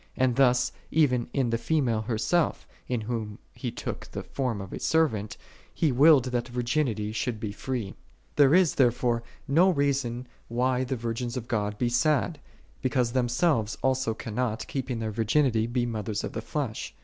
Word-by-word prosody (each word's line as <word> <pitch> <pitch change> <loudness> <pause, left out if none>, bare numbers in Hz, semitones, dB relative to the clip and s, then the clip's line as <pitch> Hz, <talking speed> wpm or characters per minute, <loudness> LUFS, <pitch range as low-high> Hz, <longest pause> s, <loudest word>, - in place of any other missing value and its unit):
And 130 -2 +2
thus, 125 -2 +3 0.2
even 130 -6 +2
in 130 -4 0
the 115 - 0
female 130 -9 +1
herself, 120 +10 0 0.2
in 125 -3 -1
whom 110 -2 -4 0.2
He - - -4
took - - -6
the - - -5
form 125 -6 -2
of 95 -1 -7
a - - -5
servant, 125 -11 +1 0.4
He 155 - +2
willed 140 +1 +6
that 120 -1 0
virginity 120 -3 -1
should 110 0 -2
be 105 -1 -3
free. 120 -1 -4
5. - - -12 0.4
There 145 +1 +6
is, 185 -4 +4
therefore, 120 -2 +2 0.3
no 170 +7 +5
reason 140 -6 0 0.2
why 125 +2 +1
the 130 +1 -2
virgins 120 +1 -3
of 120 -2 -5
God 105 -3 -1
be 120 - +1
sad, 150 +5 +1 0.4
because 125 -2 +1
themselves 125 -1 +1
also 130 -4 +1
cannot, 115 -1 -3
keeping 130 -3 -3
their 110 -1 -3
virginity, 115 +1 +2
be 120 0 0
mothers 110 -3 -3
of - - -5
the 110 - -3
flesh. 130 -3 -4
125 Hz, 170 wpm, -27 LUFS, 115-135 Hz, 0.4 s, willed